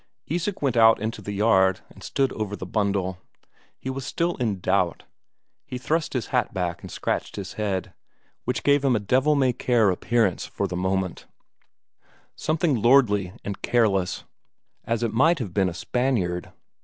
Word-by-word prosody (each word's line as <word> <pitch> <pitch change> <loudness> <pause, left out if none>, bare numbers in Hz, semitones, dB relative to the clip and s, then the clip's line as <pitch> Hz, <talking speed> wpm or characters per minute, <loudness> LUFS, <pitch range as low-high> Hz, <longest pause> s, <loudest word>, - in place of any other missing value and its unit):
Isak 175 +3 -2
went 130 -4 +1
out 115 -1 +6
into 110 0 -4
the 105 - -5
yard 95 -3 +3
and - - -16
stood 135 -2 0
over 105 -2 -3
the 95 - -7
bundle. 95 -2 -1 0.6
He 130 - -5
was 135 0 -5
still 170 +6 -1
in 110 -7 -1
doubt; - - 0 0.6
he 125 - -6
thrust 155 +6 -1
his 125 -4 -2
hat 125 -5 +1
back 85 -2 -2
and - - -9
scratched - - -2
his 95 -1 -6
head, 100 -3 -2 0.5
which 125 -1 -2
gave 145 0 +3
him 135 -3 +3
a - - +2
devil 130 +9 +2
may 130 -3 +3
care 115 -5 +2
appearance 110 +1 +1
for - - -3
the 90 - -4
moment; 95 0 -2 1.1
something 155 -6 0
lordly 105 -7 +4
and 100 -1 -5
careless, 100 -7 +1 0.6
as 115 0 -1
it 115 - -1
might 160 +9 +4
have 110 - -5
been 95 -1 +2
a - - -6
Spaniard. 100 -8 -1
110 Hz, 170 wpm, -25 LUFS, 95-130 Hz, 1.1 s, out